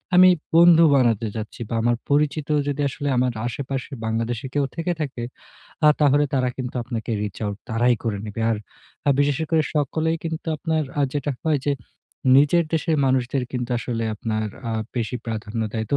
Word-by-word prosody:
আমি 185 Hz, +1 st, +9 dB, 0.3 s
বন্ধু 170 Hz, 0 st, +8 dB
বানাতে 115 Hz, -4 st, +2 dB
চাচ্ছি 110 Hz, +2 st, -6 dB
বা -, -, -2 dB
আমার 120 Hz, +1 st, +2 dB
পরিচিত 145 Hz, +1 st, +1 dB, 0.2 s
যদি 145 Hz, 0 st, -1 dB
আসলে 145 Hz, +1 st, -5 dB
আমার 125 Hz, 0 st, +2 dB, 0.2 s
আশেপাশে 135 Hz, +2 st, -4 dB
বাংলাদেশী 115 Hz, +3 st, -2 dB
কেউ 145 Hz, -1 st, +2 dB
থেকে 165 Hz, +2 st, -1 dB
থাকে, 135 Hz, -5 st, -4 dB, 0.7 s
আ -, -, +9 dB
তাহলে 145 Hz, 0 st, +4 dB
তারা 130 Hz, -1 st, +2 dB
কিন্তু 130 Hz, -1 st, -5 dB
আপনাকে 115 Hz, -2 st, -4 dB
reach 105 Hz, -2 st, -5 dB
out 100 Hz, -1 st, -3 dB
তারাই 120 Hz, +2 st, +3 dB
করে 110 Hz, -3 st, -1 dB
নিবে। 105 Hz, +2 st, -4 dB
আর 115 Hz, -, +1 dB, 0.6 s
বিশেষ 145 Hz, -1 st, +3 dB
স -, -, +1 dB
করে 160 Hz, -1 st, +4 dB
সকলেই 160 Hz, +3 st, +1 dB
কিন্তু 160 Hz, 0 st, -4 dB
আপনার 160 Hz, 0 st, 0 dB, 0.2 s
আ -, -, +4 dB
যেটা 145 Hz, 0 st, -1 dB
হয় 155 Hz, -2 st, +2 dB
যে 145 Hz, -, +3 dB, 0.6 s
নিজের 150 Hz, +5 st, +5 dB
দেশের 160 Hz, 0 st, +1 dB
মানুষদের 130 Hz, 0 st, +1 dB
কিন্তু 125 Hz, -1 st, -3 dB
আসলে 115 Hz, -1 st, -3 dB
আপনার 110 Hz, 0 st, -2 dB, 0.2 s
আ -, -, -1 dB, 0.2 s
বেশি 120 Hz, +1 st, -1 dB
প্রাধান্য 110 Hz, 0 st, -3 dB
দেয়। 110 Hz, -1 st, -2 dB
তো -, -, +5 dB
130 Hz, 175 wpm, -23 LUFS, 115-150 Hz, 0.7 s, আমি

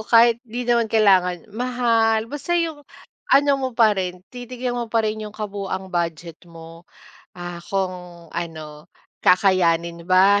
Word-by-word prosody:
kahit 235 Hz, 0 st, +6 dB
di 245 Hz, +1 st, -6 dB
naman 235 Hz, -1 st, +3 dB
kailangan 190 Hz, -3 st, +3 dB
mahal 230 Hz, -3 st, +1 dB
basta 295 Hz, +5 st, -4 dB
yung 320 Hz, -4 st, -3 dB, 0.5 s
ano 285 Hz, +1 st, +5 dB
mo 265 Hz, -1 st, -2 dB
parin, 195 Hz, -6 st, +1 dB
titignan 245 Hz, 0 st, -5 dB
mo 240 Hz, -, -2 dB
parin 215 Hz, -1 st, 0 dB
yung 210 Hz, -, -8 dB
kabuuang 195 Hz, -3 st, -5 dB
budget 170 Hz, -2 st, -3 dB
mo. 165 Hz, 0 st, -13 dB, 0.5 s
Ah, 175 Hz, -1 st, -7 dB
kung 180 Hz, -3 st, -4 dB
ano, 160 Hz, -2 st, -7 dB, 0.3 s
kakayanin 170 Hz, -2 st, +2 dB
ba, 195 Hz, +2 st, +5 dB
200 Hz, 125 wpm, -22 LUFS, 175-235 Hz, 0.5 s, kahit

